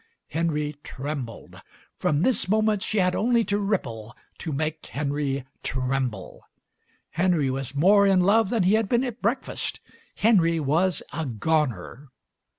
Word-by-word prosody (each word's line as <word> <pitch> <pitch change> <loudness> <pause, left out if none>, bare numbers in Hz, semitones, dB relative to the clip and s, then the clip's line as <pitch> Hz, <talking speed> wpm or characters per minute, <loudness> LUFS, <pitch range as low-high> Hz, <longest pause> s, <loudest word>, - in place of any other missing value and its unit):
Henry 150 -2 -1
trembled. 135 -4 -6 0.4
From 150 +2 +1
this 250 -6 +1
moment 215 0 +2
she 215 - -2
had 185 -2 +2
only 235 +1 +2
to 205 0 0
ripple 120 - -3 0.2
to 160 - -4
make 155 +2 -2
Henry 140 -2 -2 0.2
tremble. 130 -6 -3 0.7
Henry 170 -6 +1
was 135 0 -5
more 200 +7 +5
in 190 -2 +4
love 205 +2 +3
than 225 -4 +1
he 185 +3 +3
had 220 -2 +2
been 240 +1 +2
at 245 -2 -5
breakfast. 230 +6 -2 0.4
Henry 175 -7 +3
was 160 +6 +1
a 160 0 -3
Goner. 130 - -1
160 Hz, 140 wpm, -25 LUFS, 140-200 Hz, 0.7 s, more